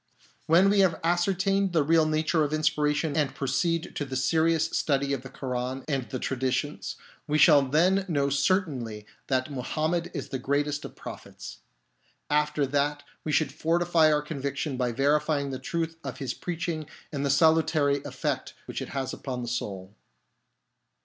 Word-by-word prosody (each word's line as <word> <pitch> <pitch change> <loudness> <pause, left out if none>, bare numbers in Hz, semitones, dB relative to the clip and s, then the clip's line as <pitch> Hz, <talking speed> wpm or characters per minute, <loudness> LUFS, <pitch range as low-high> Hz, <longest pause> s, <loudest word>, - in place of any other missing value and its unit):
When 180 +5 +5
we 205 - +3
have 185 -4 +3
ascertained 195 +2 +1
the 160 -3 +3
real 160 +1 +4
nature 155 +1 +1
of 150 0 -2
inspiration 150 -1 +1
and 150 -4 0
proceed 150 +5 -1
to - - -1
the 135 -2 -5
serious 160 +4 +2
study 140 -3 0
of 135 - -2
the 135 - -10
Koran 130 0 -4
and 135 -5 -2
the 130 - -3
traditions, 130 +3 -2 0.3
we 150 0 +1
shall 150 -1 +7
then 175 +8 +2
know 140 -5 +1
certainly 140 - 0 0.2
that 130 +1 0
Muhammed 155 +6 -1
is - - -4
the 135 - -3
greatest 145 +2 -1
of - - -9
prophets. - - -9 0.7
After 150 -1 +2
that 145 +1 0 0.2
we 155 - -2
should 150 -2 +2
fortify 165 +1 +3
our 150 -1 +2
conviction 140 -1 -3
by 125 -1 0
verifying 145 +2 +1
the 130 - -4
truth 165 -1 -3
of - - -5
his 135 -4 -3
preaching 165 -3 -4 0.2
and 140 -2 -3
the 140 - 0
salutary 155 -1 +3
effect - - -3
which - - -5
it - - -5
has 135 -2 -3
upon 125 -3 -5
the - - -5
soul. 100 -5 -4
150 Hz, 165 wpm, -27 LUFS, 135-160 Hz, 0.7 s, shall